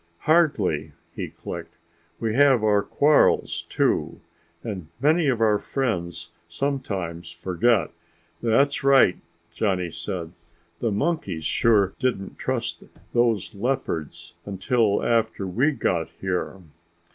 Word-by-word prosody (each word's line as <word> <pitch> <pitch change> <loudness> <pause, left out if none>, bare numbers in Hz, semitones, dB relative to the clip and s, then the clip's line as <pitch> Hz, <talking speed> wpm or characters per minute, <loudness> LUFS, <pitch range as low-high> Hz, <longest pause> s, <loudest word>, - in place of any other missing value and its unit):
"Hardly," 105 - +2 0.2
he - - -5
clicked. - - -8 0.4
"We 110 -2 -1
have 135 -3 +4
our 105 -1 +4
quarrels 145 +7 +2
too, - - 0 0.4
and 95 -8 -5
many 155 +4 +3
of 125 -4 +1
our 105 -2 +3
friends 85 -10 -3 0.2
sometimes 95 -7 -3
forget." 90 +3 +1 0.5
"That's 135 +6 +2
right," 135 -9 +5 0.3
Johnny 90 -5 -1
said. 85 0 -5 0.5
"The 115 - 0
monkeys 100 - -1
sure 100 -2 +3
didn't 125 -7 -2
trust - - -2 0.3
those 120 -4 +1
leopards 105 - -3
until 100 +2 +1
after 115 -4 +1
we 120 - +1
got 85 - -1
here." 95 0 -2
105 Hz, 110 wpm, -24 LUFS, 90-130 Hz, 0.5 s, right